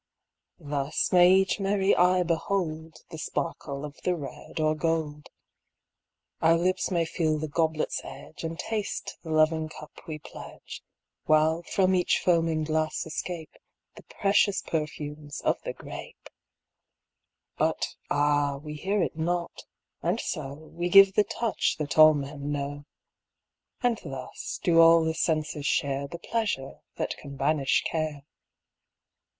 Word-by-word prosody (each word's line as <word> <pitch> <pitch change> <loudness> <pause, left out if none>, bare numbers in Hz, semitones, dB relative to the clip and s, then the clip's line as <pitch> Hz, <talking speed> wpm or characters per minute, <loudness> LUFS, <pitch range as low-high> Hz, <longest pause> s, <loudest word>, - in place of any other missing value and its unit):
Thus 145 -2 -2
may 180 0 +7
each 190 +1 +3
merry 195 0 +2
eye 180 0 +4
behold 160 -2 -2
The 160 - -7
sparkle 145 -2 -4
of 145 -1 -9
the 180 - +1
red 150 +1 -8
or 155 0 +2
gold. 155 -2 -2 1.1
Our 165 +1 +5
lips 180 +1 0
may 170 -2 +1
feel 160 -1 0
the 155 +1 -3
goblet's 160 0 0
edge 155 - -10
And 165 0 -4
taste 215 +2 -4
the 165 - -10
loving 155 0 +2
cup 155 -1 -11 0.2
we 155 -2 -4
pledge. 150 - -10 0.4
While 155 +2 +3
from 190 +2 +1
each 180 -1 +2
foaming 165 -3 +2
glass 155 0 -1
escape 160 0 -5 0.4
The - - -12
precious 200 -1 +1
perfumes 150 -2 -4
of - - 0
the - - -4
grape. - - -10 1.3
But - - 0 0.2
ah, 145 -1 +2
we 150 +2 -8
hear 195 +4 0
it - - -3
not, 170 +2 -2 0.4
and - - 0
so 135 +1 -4 0.2
We 175 +1 -2
give 195 +1 +8
the 210 +1 +3
touch 230 -3 -1
that 150 0 -2
all 155 0 +9
men 140 0 -4
know. 145 0 -4 1.0
And 240 -3 +2
thus 135 -4 -6
do 165 -2 +4
all 165 0 +7
the 160 0 0
senses 155 -2 -1
share 140 0 0
The 170 - -7
pleasure 195 -9 -3 0.2
that - - -2
can 140 0 -9
banish 140 0 +2
care. 155 -3 -2
160 Hz, 140 wpm, -27 LUFS, 150-175 Hz, 1.3 s, all